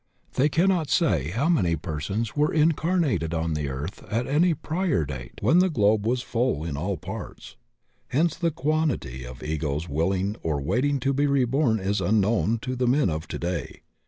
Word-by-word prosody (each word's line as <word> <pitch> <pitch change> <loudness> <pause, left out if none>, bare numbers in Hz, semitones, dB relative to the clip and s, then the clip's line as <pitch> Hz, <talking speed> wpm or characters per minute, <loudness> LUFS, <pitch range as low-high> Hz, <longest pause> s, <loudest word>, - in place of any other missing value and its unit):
They 145 +4 +3
cannot 170 0 +2
say 90 - +2
how 120 - 0
many 95 - +2
persons 90 +8 -3
were 150 +1 +2
incarnated 155 - +1
on 80 0 -1
the 75 -2 -2
earth 70 +7 -6
at 115 +3 0
any 160 +4 +3
prior 160 - -1
date 65 -4 -7
when 130 - +4
the 185 +1 +4
globe 105 - +2
was 125 +1 0
full 120 - 0
in 80 -4 -3
all 90 +6 -2
parts, - - -8 0.5
hence 160 +4 +1
the 170 0 0
quantity 145 - -1
of 60 0 -10
egos 75 0 -2
willing 95 +7 0
or 75 -3 -1
waiting 130 - 0
to 135 +2 +1
be 145 +2 +2
reborn 135 -3 +2
is 100 +2 -1
imknown 110 +2 +2
to 130 +2 -3
the 125 0 0
men 130 - +3
of 80 +1 -4
today. 85 -1 -4
115 Hz, 175 wpm, -25 LUFS, -, 0.5 s, when